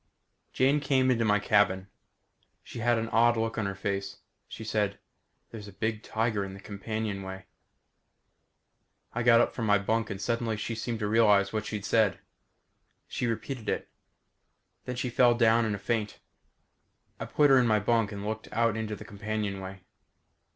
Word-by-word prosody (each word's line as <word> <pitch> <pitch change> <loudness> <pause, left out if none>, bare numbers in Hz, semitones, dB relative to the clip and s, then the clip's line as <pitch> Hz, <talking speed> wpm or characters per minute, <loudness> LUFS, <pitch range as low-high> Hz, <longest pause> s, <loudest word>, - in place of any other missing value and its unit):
Jane 135 +3 +3
came 130 -2 +2
into 115 -2 +1
my 105 -1 +4
cabin. 105 -2 +2 0.8
She - - -9
had 120 +1 +2
an 115 0 -2
odd 115 +1 +4
look 115 0 -1
on 100 - -1
her 100 - -4
face. 100 0 -3 0.3
She 110 - -9
said, 105 -2 -1 0.5
"There's 105 -3 -8
a - - -10
big 110 +2 -3
tiger 110 -2 -1
in 95 0 -7
the - - -11
companionway." 100 -2 -5 1.7
I 120 - -2
got 115 -1 +6
up - - 0
from 115 -3 -3
my 105 0 +5
bunk 110 +3 -1
and 100 -2 -5
suddenly 115 +1 -1
she 110 +2 -3
seemed 115 +1 -3
to 105 - 0
realize 105 -2 +4
what 110 -1 -2
she'd 105 -2 -4
said. 105 -3 +2 0.9
She 120 - -2
repeated 115 0 -4
it. - - -2 1.0
Then 125 - -4
she 125 0 -3
fell 120 0 +4
down 115 0 +4
in 105 -2 -1
a - - -5
faint. 105 0 -2 1.0
I - - -4
put 145 -2 +3
her 135 - +7
in 125 - +3
my 110 -1 +3
bunk 115 0 +1
and 100 0 -6
looked 110 +1 -5
out 115 0 +1
into 110 -1 -3
the - - -11
companionway. 100 -2 -4
110 Hz, 170 wpm, -28 LUFS, 100-115 Hz, 1.7 s, her